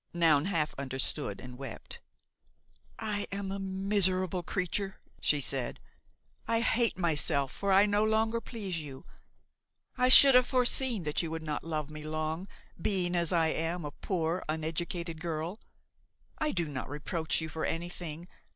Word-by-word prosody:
Noun 160 Hz, -3 st, +4 dB
half 165 Hz, -6 st, 0 dB
understood 130 Hz, -6 st, -3 dB
and 125 Hz, 0 st, -10 dB
wept. 135 Hz, -5 st, -8 dB, 1.0 s
"I 210 Hz, -2 st, -2 dB
am 200 Hz, 0 st, -3 dB
a 195 Hz, -, -3 dB
miserable 190 Hz, -1 st, +2 dB
creature," 195 Hz, +2 st, -3 dB, 0.2 s
she 150 Hz, -, +2 dB
said; 130 Hz, 0 st, -1 dB, 0.7 s
"I 230 Hz, 0 st, +2 dB
hate 235 Hz, -2 st, +2 dB
myself, 150 Hz, -5 st, +1 dB
for 200 Hz, -1 st, -1 dB
I 195 Hz, +2 st, +7 dB
no 205 Hz, 0 st, +2 dB
longer 220 Hz, +1 st, +1 dB
please 200 Hz, -9 st, -4 dB
you. 140 Hz, -4 st, -9 dB, 0.9 s
I 250 Hz, 0 st, +4 dB
should 275 Hz, +1 st, +10 dB
have 250 Hz, 0 st, +6 dB
foreseen 250 Hz, -4 st, +2 dB
that 150 Hz, -1 st, 0 dB
you 165 Hz, -, -3 dB
would 160 Hz, 0 st, -4 dB
not 150 Hz, -2 st, -3 dB
love 155 Hz, -2 st, -3 dB
me 155 Hz, 0 st, -7 dB
long, 155 Hz, +4 st, -3 dB, 0.3 s
being, 180 Hz, -2 st, 0 dB
as 170 Hz, -2 st, +1 dB
I 165 Hz, -2 st, +3 dB
am, 165 Hz, +1 st, -2 dB
a 145 Hz, -, -4 dB
poor, 170 Hz, +1 st, -2 dB
uneducated 160 Hz, +1 st, -3 dB
girl. 165 Hz, +4 st, -3 dB, 0.8 s
I 305 Hz, -, +1 dB
do 175 Hz, -3 st, 0 dB
not 140 Hz, -4 st, -5 dB
reproach 155 Hz, +3 st, -2 dB
you 160 Hz, -, -3 dB
for 160 Hz, 0 st, -5 dB
anything. 170 Hz, -1 st, -3 dB
170 Hz, 150 wpm, -31 LUFS, 155-200 Hz, 1.0 s, should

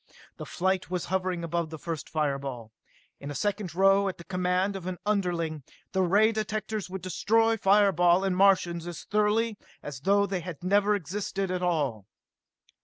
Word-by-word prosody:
The -, -, -7 dB
flight 190 Hz, +1 st, -1 dB
was 180 Hz, -1 st, -2 dB
hovering 185 Hz, -2 st, -1 dB
above 170 Hz, 0 st, -2 dB
the 160 Hz, -, -7 dB
first 165 Hz, -1 st, -5 dB
fireball. 140 Hz, -7 st, -3 dB, 0.5 s
In 140 Hz, -, -7 dB
a 145 Hz, -, -5 dB
second 205 Hz, -3 st, -2 dB
now, 195 Hz, +1 st, +4 dB
at 190 Hz, -, -3 dB
the 170 Hz, -, -11 dB
command 180 Hz, +2 st, 0 dB
of 185 Hz, -2 st, -6 dB
an 185 Hz, -1 st, -3 dB
underling, 175 Hz, -7 st, -1 dB, 0.3 s
the 190 Hz, -, +1 dB
ray 205 Hz, +5 st, +4 dB
directors 215 Hz, -2 st, -3 dB
would 190 Hz, -1 st, -6 dB
destroy 225 Hz, +4 st, +2 dB
fire 200 Hz, -1 st, +4 dB
ball 175 Hz, +1 st, +3 dB
and 190 Hz, -2 st, 0 dB
Martians 180 Hz, -3 st, +3 dB
as 175 Hz, -2 st, -7 dB
thoroughly 210 Hz, +1 st, +1 dB, 0.2 s
as 145 Hz, -3 st, -7 dB
though 200 Hz, +7 st, +3 dB
they 195 Hz, -2 st, -2 dB
had 175 Hz, -2 st, -8 dB
never 205 Hz, +2 st, +3 dB
existed 195 Hz, +1 st, -3 dB
at 180 Hz, -1 st, -2 dB
all. 140 Hz, -, -1 dB
185 Hz, 175 wpm, -28 LUFS, 170-200 Hz, 0.5 s, now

